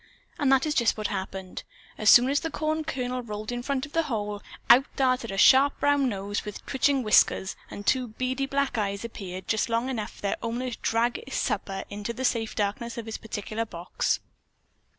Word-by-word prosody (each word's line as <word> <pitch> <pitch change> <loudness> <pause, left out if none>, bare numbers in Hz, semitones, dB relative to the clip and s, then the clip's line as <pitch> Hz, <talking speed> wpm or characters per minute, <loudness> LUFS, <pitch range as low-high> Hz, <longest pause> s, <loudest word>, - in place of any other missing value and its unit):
And 280 -3 +3
that 270 +1 +4
is 305 - 0
just 235 -7 +2
what 215 - -4
happened. 190 -1 -5 0.3
As 215 -1 +2
soon 245 +1 +8
as 285 - +2
the 325 - -3
corn 310 +1 -1
kernel 255 -4 -3
rolled 215 -1 -6
in 245 0 -3
front 270 +1 -2
of 295 - -15
the 330 - +3
hole, 210 -3 -3 0.3
out 255 +3 +7
darted 255 -3 +1
a 195 - -4
sharp 270 +7 +6
brown 285 -2 +3
nose 200 -1 -3
with 210 -1 -8
twitching 275 0 +1
whiskers 210 -2 +3
and 205 - -8
two 255 +2 +2
beady 255 +4 -2
black 275 -3 0
eyes 200 +1 -2
appeared 190 -5 -7
just 220 +1 0
long 230 +3 0
enough 225 -5 -4
for - - -16
their 200 - 0
owner 240 +2 -3
to - - -6
drag 235 +2 0
his 270 - -5
supper 195 -1 -2
into 205 +3 -4
the 260 +3 -3
safe 225 -3 0
darkness 210 +4 -2
of 230 - -5
his 225 - -5
particular 220 0 -4
box. 175 -5 -2
235 Hz, 205 wpm, -27 LUFS, 210-260 Hz, 0.3 s, soon